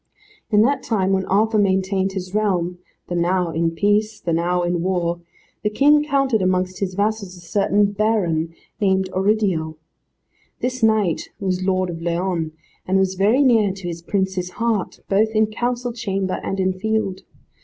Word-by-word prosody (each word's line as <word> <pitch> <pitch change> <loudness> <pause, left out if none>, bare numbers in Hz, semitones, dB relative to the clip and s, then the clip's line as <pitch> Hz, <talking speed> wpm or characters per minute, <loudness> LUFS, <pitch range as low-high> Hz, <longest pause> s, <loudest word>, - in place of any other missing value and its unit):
In 210 -1 +5
that 270 +2 +1
time 195 -6 0
when 190 -1 0
Arthur 215 +3 +2
maintained 190 -1 +1
his 185 -1 -5
realm, 180 -4 0 0.3
the - - -4
now 175 0 +1
in 165 +1 +1
peace, 205 +5 +1
the 170 - -2
now 175 +2 +1
in 175 -1 0
war, 175 -2 -1 0.4
the 210 - 0
King 295 +7 +4
counted 275 -6 +1
amongst 185 0 0
his 185 -2 -2
vassals 200 -2 -1
a - - -12
certain 200 +3 +1
baron, 195 -7 0 0.3
named 190 -2 +1
Oridial. 190 -5 +1 0.8
This 255 0 -2
knight 215 -6 +2
was 185 -2 -1
lord 185 -1 0
of 165 -1 -7
Leon, 170 -1 -1 0.4
and 190 +1 +2
was 190 -1 +2
very 210 +9 +3
near 225 -6 +4
to 195 -2 -8
his 170 -1 -5
prince's 190 0 -1
heart, 230 -5 -1
both 210 +3 +3
in 215 0 +5
council 240 +2 -2
chamber 195 -5 -2
and 195 - -3
in 185 0 +1
field. 200 -1 -2
190 Hz, 165 wpm, -21 LUFS, 180-215 Hz, 0.8 s, In